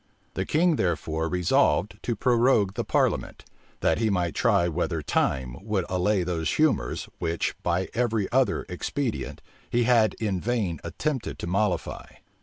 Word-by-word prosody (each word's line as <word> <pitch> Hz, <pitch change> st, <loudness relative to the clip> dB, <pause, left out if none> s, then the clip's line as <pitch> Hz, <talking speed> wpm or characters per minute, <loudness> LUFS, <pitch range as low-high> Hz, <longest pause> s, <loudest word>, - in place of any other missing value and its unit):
The -, -, -3 dB
king 165 Hz, 0 st, +3 dB
therefore 80 Hz, -2 st, -1 dB
resolved 90 Hz, +1 st, +2 dB
to 120 Hz, -, -2 dB
prorogue 120 Hz, -5 st, +3 dB
the -, -, -2 dB
parliament, -, -, 0 dB, 0.4 s
that -, -, +2 dB
he 115 Hz, -1 st, +2 dB
might 90 Hz, -4 st, 0 dB
try 85 Hz, -, +3 dB
whether 85 Hz, -1 st, -2 dB
time 65 Hz, -3 st, 0 dB
would 100 Hz, -4 st, -1 dB
allay 90 Hz, +1 st, +1 dB
those 85 Hz, -3 st, -1 dB
humors, 155 Hz, -, +1 dB
which, 85 Hz, 0 st, -1 dB
by 90 Hz, +2 st, 0 dB
every 115 Hz, -4 st, 0 dB
other, 130 Hz, -5 st, +2 dB
expedient, 115 Hz, +7 st, -3 dB, 0.3 s
he 120 Hz, 0 st, +2 dB
had 115 Hz, -3 st, +3 dB
in 100 Hz, -5 st, -2 dB
vain 105 Hz, -9 st, -1 dB
attempted 130 Hz, -, -3 dB
to -, -, -5 dB
mollify. 95 Hz, +2 st, -1 dB
95 Hz, 145 wpm, -26 LUFS, 85-120 Hz, 0.4 s, king